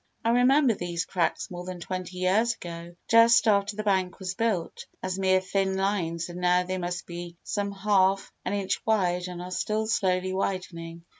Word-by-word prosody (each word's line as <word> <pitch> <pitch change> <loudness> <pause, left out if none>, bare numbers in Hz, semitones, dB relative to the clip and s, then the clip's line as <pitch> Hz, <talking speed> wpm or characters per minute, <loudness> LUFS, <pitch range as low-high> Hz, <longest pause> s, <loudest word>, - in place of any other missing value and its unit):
I - - +3
remember 250 +2 +4
these 175 -3 -3
cracks 180 0 -1
more 175 0 -6
than 180 0 -6
twenty 185 0 -5
years 210 +6 +2
ago, 170 0 -8
just 230 +1 +6
after 200 -1 +2
the 215 - -3
bank 190 -3 +1
was 185 -2 -4
built, 205 -5 -2 0.2
as 185 0 -2
mere 190 -1 +4
thin 190 0 0
lines 175 -4 -1
and 175 0 -7
now 180 0 +3
they 185 +1 -3
must 175 0 -4
be 175 0 -8
some 200 -1 -2
half 195 -1 +2
an - - -2
inch 200 -2 -1
wide 180 -5 +1
and 180 -1 -6
are 180 - -8
still 215 +4 -1
slowly 185 -4 0
widening. 170 -3 -4
185 Hz, 180 wpm, -27 LUFS, 180-205 Hz, 0.2 s, just